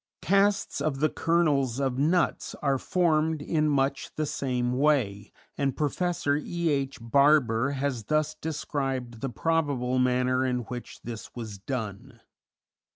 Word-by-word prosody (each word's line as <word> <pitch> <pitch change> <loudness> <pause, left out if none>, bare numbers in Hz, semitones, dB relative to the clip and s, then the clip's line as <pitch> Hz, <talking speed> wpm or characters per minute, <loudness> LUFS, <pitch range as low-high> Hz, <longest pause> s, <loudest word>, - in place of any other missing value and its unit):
Casts 200 +1 +2
of 140 -3 -1
the 155 +2 +3
kernels 145 -7 +1
of 135 -2 -1
nuts 170 +5 +1
are 135 -2 +2
formed 160 -2 +1
in 150 +1 0
much 135 -1 0
the 155 - -1
same 125 -4 -1
way, 115 -9 +1 0.3
and 140 -2 0
Professor 150 -1 0
E. 170 +3 -1
H. 140 -2 -1
Barbour 135 0 +3
has 130 -5 -2
thus 155 -1 +1
described 135 -6 -3
the 135 - -2
probable 135 -2 0
manner 125 0 +2
in 125 -1 0
which 120 +1 -8
this 115 -2 -7
was 110 -5 -6
done. 120 +1 -5
135 Hz, 135 wpm, -27 LUFS, 125-155 Hz, 0.3 s, the